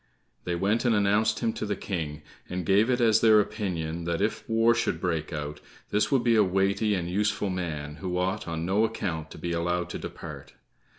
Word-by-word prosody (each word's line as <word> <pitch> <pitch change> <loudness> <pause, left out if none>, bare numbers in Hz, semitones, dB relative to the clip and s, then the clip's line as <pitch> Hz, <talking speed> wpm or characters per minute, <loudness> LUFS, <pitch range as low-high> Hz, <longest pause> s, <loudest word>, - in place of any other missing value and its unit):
They 90 - -1
went 100 +6 +1
and 120 -3 +3
announced 105 +2 +2
him 115 -2 +1
to - - -5
the 105 - -1
King, 80 -6 -4 0.3
and 90 -1 -3
gave 100 +6 +4
it 125 0 +2
as 115 -3 +4
their 110 -2 +7
opinion 85 -6 -2
that 85 -1 -1
if 105 +3 -2
war 115 +1 +4
should 115 -8 -1
break 85 -3 -2
out, 75 -1 -5 0.3
this 105 +6 +1
would 135 -3 +3
be 120 -1 +4
a 110 - +6
weighty 100 +3 +1
and 85 -2 -2
useful 100 +1 0
man 75 -5 -4
who 90 -2 -3
ought 95 +3 -1
on 80 0 -3
no 100 +5 +2
account 85 -8 -2
to - - -11
be 85 +2 -4
allowed 85 +1 -1
to - - -4
depart. - - -8
95 Hz, 210 wpm, -27 LUFS, 85-110 Hz, 0.3 s, their